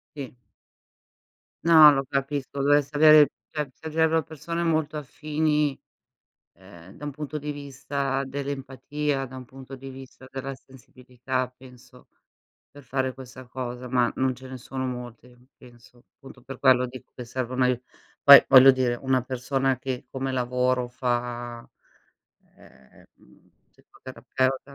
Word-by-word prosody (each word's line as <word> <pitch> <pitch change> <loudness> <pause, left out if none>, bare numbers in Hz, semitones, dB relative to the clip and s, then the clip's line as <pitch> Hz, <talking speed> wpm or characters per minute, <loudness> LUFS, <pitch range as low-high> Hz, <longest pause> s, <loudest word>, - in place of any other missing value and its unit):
Sì. 130 -3 -8 1.3
No, 160 -3 +9
lo 135 -1 -1
capisco. 140 0 -3
Dovresti 145 +1 +2
avere 155 -1 +7 0.2
cioè, 150 -3 -4
servirebbero 160 +1 0
persone 165 +2 -5
molto 155 -2 0
affini, 150 0 -1 0.8
ehm, 95 -1 -16
da 150 - -14
un 145 - -4
punto 150 +1 -6
di 150 0 -5
vista 140 -1 -3
dell'empatia, 140 +1 -4
da 130 0 -11
un 130 - -8
punto 135 +1 -11
di 135 +1 -10
vista 130 0 -12
della 135 0 -5
sensibilità, 130 -1 -6
penso, 125 -1 -18 0.6
per 145 - -14
fare 130 0 -2
questa 130 0 -12
cosa, 125 0 -6
ma 120 -1 +2
non 130 0 0
ce 130 +2 -12
ne 130 0 -8
sono 130 +2 -5
molte 125 -1 -8 0.2
penso. 120 0 -19
Appunto 135 -1 -15
per 135 +2 -10
quello 130 -2 +4
dico 130 +1 -12
che 125 - -8
serve 125 +1 -4
un 130 - +2
aiu 125 -1 +1 0.4
poi 140 0 +10
voglio 135 +1 +9
dire, 130 -2 0
una 130 -1 +1
persona 130 +1 -1
che 130 -2 -5
come 135 0 -3
lavoro 125 0 0
fa, 120 -1 -4 0.9
ehm, 65 0 -20
mhmm, - - -25 0.2
psicoterapeuta 130 +1 -4
130 Hz, 140 wpm, -25 LUFS, 125-140 Hz, 1.3 s, poi